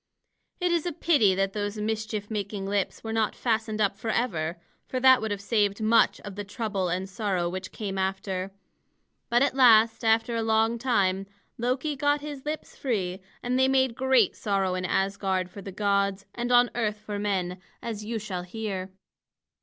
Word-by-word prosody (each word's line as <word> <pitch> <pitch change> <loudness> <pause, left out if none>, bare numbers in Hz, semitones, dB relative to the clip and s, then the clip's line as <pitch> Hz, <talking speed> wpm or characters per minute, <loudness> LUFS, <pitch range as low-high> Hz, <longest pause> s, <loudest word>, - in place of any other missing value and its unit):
It 360 -1 +1
is 340 0 +1
a - - 0
pity 265 - +3
that 195 0 0
those 205 0 -3
mischief 215 0 -3
making 200 -2 -3
lips 200 -1 -1
were 225 0 -4
not 220 -1 +1
fastened 220 -2 -1
up 200 -2 +2
forever; 190 -7 -1 0.3
for 255 - -2
that 260 0 +6
would 220 - -2
have 205 -1 -2
saved 205 -1 +1
much 220 +1 +3
of 205 - -8
the 205 - -4
trouble 200 -3 -2
and 185 +2 -2
sorrow 190 -4 -1
which 185 +1 -5
came 195 -3 -4
after. 190 0 -2 0.8
But 240 +2 +4
at 280 - +1
last, 230 -3 +5
after 225 +1 +2
a 230 - 0
long 225 +1 +2
time, 195 -6 +1 0.3
Loki 255 +5 0
got 290 +1 +1
his 290 -2 -7
lips 305 +1 -5
free, 190 -8 -2 0.2
and 250 +1 0
they 260 - +5
made 265 -2 +3
great 260 -3 +3
sorrow 195 -3 0
in 185 0 -2
Asgard 190 -1 0
for 200 - -9
the 195 - -7
gods 200 0 0
and 240 +1 -3
on 245 0 +5
earth 215 -3 -1
for 210 -1 -5
men, 185 -3 -1 0.2
as 220 -3 -4
you 225 +2 -3
shall 200 -4 -4
hear. 190 0 -4
210 Hz, 180 wpm, -27 LUFS, 195-235 Hz, 0.8 s, that